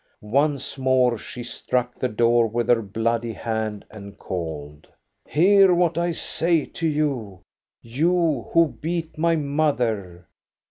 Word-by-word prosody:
Once 140 +4 0
more 130 -2 +3
she 120 +2 -8
struck 125 +1 -2
the 130 - +1
door 115 +1 +3
with 115 +1 -2
her 120 -2 +4
bloody 115 +2 -2
hand 110 -2 -4
and 100 -2 -11
called: 75 -4 -6 0.2
— - - -52
"Hear 190 +3 +5
what 170 -1 +2
I 170 +1 0
say 165 -1 0
to 165 - -3
you, 135 - -2 0.2
— - - -70
you, 155 - 0
who 165 -1 +5
beat 165 +1 -3
my 165 +1 +3
mother. 125 - -1
125 Hz, 140 wpm, -23 LUFS, 110-160 Hz, 0.2 s, Hear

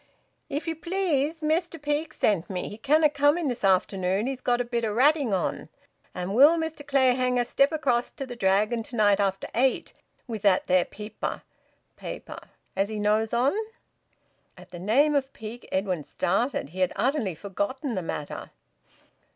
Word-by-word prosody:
"If 295 +4 -3
ye 330 - 0
please, 325 -3 -1
Mester 330 +2 0
Peake's 295 +1 -2
sent 195 -5 +1
me. 185 -2 -3
He 210 - -10
canna 300 +6 +4
come 290 +1 +2
in 330 -5 -1
this 245 - -4
afternoon 190 +1 +1
he's 265 -1 -3
got 245 -1 +1
a 245 - 0
bit 235 -1 -2
o' 220 - 0
ratting 275 +2 +3
on 190 - -2 0.5
and 180 +2 -3
will 290 +8 +7
Mester 320 -2 -4
Clayhanger 255 -3 +2
step 275 +4 +2
across 260 -6 0
to 275 - -7
th' 245 -2 -9
Dragon 210 +4 +2
to 230 +2 -9
night 205 -2 +4
after 195 -1 0
eight, 255 +2 +1 0.3
with 225 -5 -5
that 195 -3 +3
there 185 -1 +3
peeper 210 +1 -6 0.5
[paper] - - -7 0.4
as 195 +2 0
he 215 - -4
knows 215 +1 +1
on?" 245 +4 +2 1.0
At - - -15
the 175 - -8
name 260 - +3
of 275 -1 0
Peake, 220 +2 -9
Edwin 190 -4 -1
started. 195 - -1
He 180 +4 -9
had 185 - +1
utterly 245 - 0
forgotten 205 - -3
the 190 - -2
matter. 150 -3 -5
240 Hz, 170 wpm, -26 LUFS, 200-285 Hz, 1.0 s, will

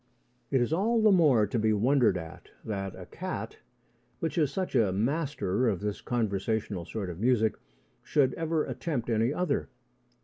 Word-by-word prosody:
It 135 -3 +2
is 120 +6 0
all 225 +7 +2
the 215 -1 +5
more 150 - +5
to 115 +3 -2
be 110 0 +2
wondered 115 -2 +3
at 80 -2 -9 0.2
that 95 -3 -4
a - - -9
cat, - - -6 0.6
which 165 - -2
is 150 -5 +2
such 185 +4 -3
a 115 -7 +3
master 125 - 0
of 100 -6 +1
this 105 0 -3
conversational 105 -4 -1
sort 100 -2 -4
of 85 - -9
music, 110 -1 +3 0.5
should 135 -3 +2
ever 165 -1 -1
attempt 130 -2 -3
any 115 +3 +2
other. 165 -2 -1
120 Hz, 165 wpm, -29 LUFS, 105-150 Hz, 0.6 s, the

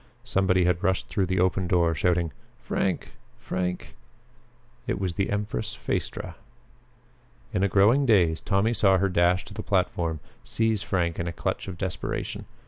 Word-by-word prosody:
Somebody 95 -1 +2
had 90 0 +1
rushed 95 -1 0
through 95 -4 0
the 95 0 0
open 95 0 +2
door 85 -2 +3
shouting, 85 +1 +1 0.3
"Frank! - - -2 0.3
Frank!" 90 -1 -3 0.9
It - - -1
was 95 -3 -1
the 95 +3 -1
empress 100 -11 -2
Phaestra. 90 -3 -4 1.2
In 100 - +1
a 100 - +4
growing 115 +9 +4
daze 85 -8 +4
Tommy 105 +3 +1
saw 95 -3 +4
her 100 +1 +1
dash 90 +1 +2
to 105 - -11
the - - -5
platform, 85 -4 0 0.2
seize 110 -3 0
Frank 90 -5 -1
in 85 - -2
a - - -1
clutch 85 - -3
of 95 -3 -6
desperation. 90 -5 -4
95 Hz, 155 wpm, -26 LUFS, 85-100 Hz, 1.2 s, a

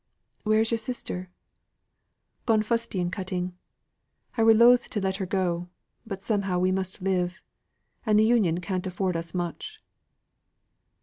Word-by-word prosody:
"Where 215 0 +3
is 225 - +1
your 230 - +1
sister?" 215 -6 -5 1.2
"Gone 220 -2 +4
fustian 210 -6 -1
cutting. 180 -1 -3 0.8
I 230 - +1
were 225 0 +7
loth 240 +2 +6
to 210 - -2
let 190 -1 -1
her 190 -2 -3
go; 175 -2 -1 0.4
but 195 -2 -6
somehow 200 -4 0
we 185 +1 +2
must 190 0 -2
live; 185 0 -1 0.6
and 215 -2 +3
th' 215 - +6
Union 210 -7 +3
can't 185 +1 -2
afford 185 0 -1
us 165 +1 -4
much." 180 - -4
190 Hz, 140 wpm, -27 LUFS, 180-220 Hz, 1.2 s, were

